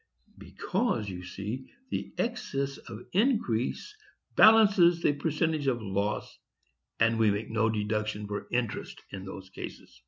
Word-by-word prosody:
Because, 120 - -1
you 90 -1 -6
see, 105 +8 -6 0.2
the - - -3
excess 140 - -2
of 115 0 -7
increase 210 - +1 0.4
balances 195 -6 +6
the - - +4
percentage 155 0 0
of 125 -3 +2
loss, 100 0 -2 0.6
and 115 0 +3
we 110 -1 +5
make 105 +2 -2
no 110 0 +2
deduction 105 -1 -1
for 105 0 -5
interest 120 -2 -2
in 95 -1 -7
those 95 -1 -9
cases." - - -9
115 Hz, 130 wpm, -29 LUFS, 105-160 Hz, 0.6 s, balances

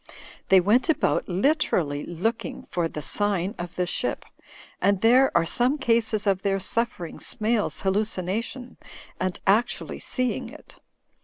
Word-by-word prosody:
They 190 - +7
went 215 - +2
about 320 - +1
literally 180 - +1
looking 210 +7 -3
for 170 -2 -2
'The 150 -2 -7
Sign 200 -2 +1
of 175 0 -6
the 180 - 0
Ship/ 175 - -1 0.6
and 200 -1 +3
there 255 +4 +5
are 170 - +2
some 245 - +1
cases 230 -5 +1
of 195 -2 +1
their 195 0 0
suffering 195 -4 -2
SmaiVs 215 -1 -1
Hallucination 210 +5 -2 0.4
and 185 -1 -2
actually 215 +5 +1
seeing 255 -1 -2
it. - - -15
205 Hz, 135 wpm, -25 LUFS, 180-235 Hz, 0.6 s, They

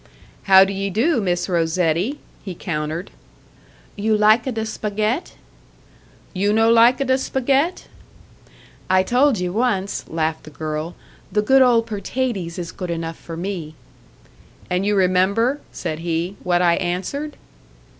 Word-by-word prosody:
"How 190 0 +9
do 195 - -4
ye 195 0 -2
do, 235 - +1
Miss 175 -2 -1
Rosetti?" 170 - 0 0.3
he 190 -3 -6
countered. 160 0 -4 0.8
"You 215 +1 +1
lika 215 +5 +4
da 220 -2 -3
spagett?" 215 - -2 1.0
"You 200 +2 +1
no 225 +1 +4
lika 240 +4 +5
da 260 0 +2
spagett?" 270 +6 0 1.1
"I 185 0 +4
told 250 +4 +3
ye 180 - -1
once," 200 -1 -1
laughed 160 0 -2
the - - -9
girl 155 +2 -5 0.4
"the 210 - +1
good 265 +5 +5
old 240 -3 +4
pertaties 210 -4 -3
is 175 -1 -5
good 180 -2 -6
enough 165 -1 -4
for 165 -1 -9
me!" 170 -4 -5 1.0
"And 185 +2 0
you 210 - +2
remember," 195 +8 +2
said 155 - -4
he, 170 +3 -2
"what 175 0 +1
I 170 -1 +3
answered?" 190 +12 -3
195 Hz, 135 wpm, -21 LUFS, 175-230 Hz, 1.1 s, How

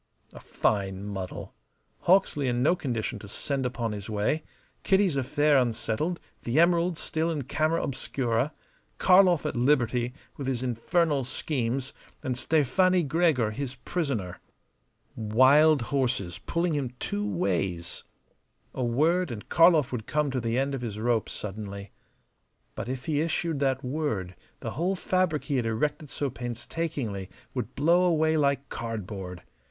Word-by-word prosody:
A - - -10
fine 95 -2 -1
muddle! 95 -3 -6 0.5
Hawksley 170 -7 +3
in 120 0 +1
no 165 +6 +4
condition 120 -7 -3
to 100 - -10
send 135 +5 -2
upon 120 -2 -3
his 105 -1 -6
way; 110 +9 0 0.4
Kitty's 190 -5 +3
affair 145 +2 +3
unsettled; 120 +7 -1 0.2
the 120 +6 +1
emeralds 170 0 +3
still 160 +1 -1
in 155 -4 -2
camera 155 +5 0
obscura; 130 -1 -1 0.5
Karlov 180 -3 +5
at - - -2
liberty 125 -1 +2 0.2
with 140 - -4
his 130 -2 -1
infernal 140 +4 +1
schemes, 130 0 -2 0.3
and 130 - -1
Stefani 165 +7 +3
Gregor 150 -7 +2
his 130 +3 -4
prisoner. 125 - -3 0.8
Wild 130 +6 +5
horses, 120 - -1
pulling 170 0 -1
him 135 -4 -2
two 105 -3 -2
ways. 90 -2 -1 0.7
A 130 - -2
word, 160 +9 +2
and 110 -4 -7
Karlov 165 -5 +5
would 115 -4 -4
come 150 -2 0
to 130 - -1
the 115 +1 -1
end 135 +1 0
of 135 - -3
his 110 -4 -4
rope 115 0 0
suddenly. 100 -1 -6 0.8
But - - -5
if 130 -1 -4
he 150 -2 +1
issued 165 -1 -1
that 135 -1 +1
word 125 - -2 0.3
the - - -4
whole 175 +8 0
fabric 185 -4 0
he 140 -3 -1
had 120 - 0
erected 145 +7 -1
so 140 -1 -2
painstakingly 120 - -4 0.2
would 125 -2 -4
blow 170 +5 +4
away 160 -2 +3
like 140 -2 +1
cardboard. 95 -5 -5
130 Hz, 145 wpm, -27 LUFS, 115-155 Hz, 0.8 s, Karlov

